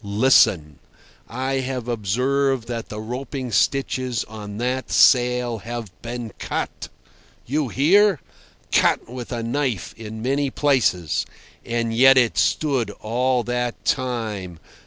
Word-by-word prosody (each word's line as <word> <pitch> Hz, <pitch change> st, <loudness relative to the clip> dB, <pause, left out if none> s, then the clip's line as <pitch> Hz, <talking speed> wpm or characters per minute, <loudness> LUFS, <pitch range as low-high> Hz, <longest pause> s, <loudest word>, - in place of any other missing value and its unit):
Listen: 100 Hz, -, +3 dB, 0.5 s
I 130 Hz, +1 st, -2 dB
have 130 Hz, -2 st, -4 dB
observed 125 Hz, +3 st, 0 dB
that 120 Hz, -2 st, -5 dB
the 105 Hz, -, -6 dB
roping 125 Hz, +3 st, -5 dB
stitches 130 Hz, 0 st, 0 dB
on 105 Hz, -1 st, -9 dB
that 125 Hz, +2 st, -2 dB
sail 120 Hz, +3 st, +4 dB
have 115 Hz, -1 st, -6 dB
been 120 Hz, -1 st, -6 dB
cut! -, -, -4 dB, 0.6 s
You 145 Hz, +2 st, -1 dB
hear? 185 Hz, -, +4 dB, 0.5 s
Cut -, -, +2 dB
with 125 Hz, +1 st, -8 dB
a 120 Hz, -2 st, -3 dB
knife 120 Hz, -4 st, -2 dB
in 110 Hz, 0 st, -8 dB
many 140 Hz, +2 st, 0 dB
places. 125 Hz, -, +1 dB, 0.4 s
And 115 Hz, -1 st, -2 dB
yet 135 Hz, +2 st, +7 dB
it 120 Hz, -3 st, +3 dB
stood 140 Hz, -6 st, +1 dB
all 125 Hz, +3 st, 0 dB
that 125 Hz, 0 st, -3 dB
time. 110 Hz, -9 st, -2 dB
120 Hz, 120 wpm, -22 LUFS, 110-130 Hz, 0.6 s, yet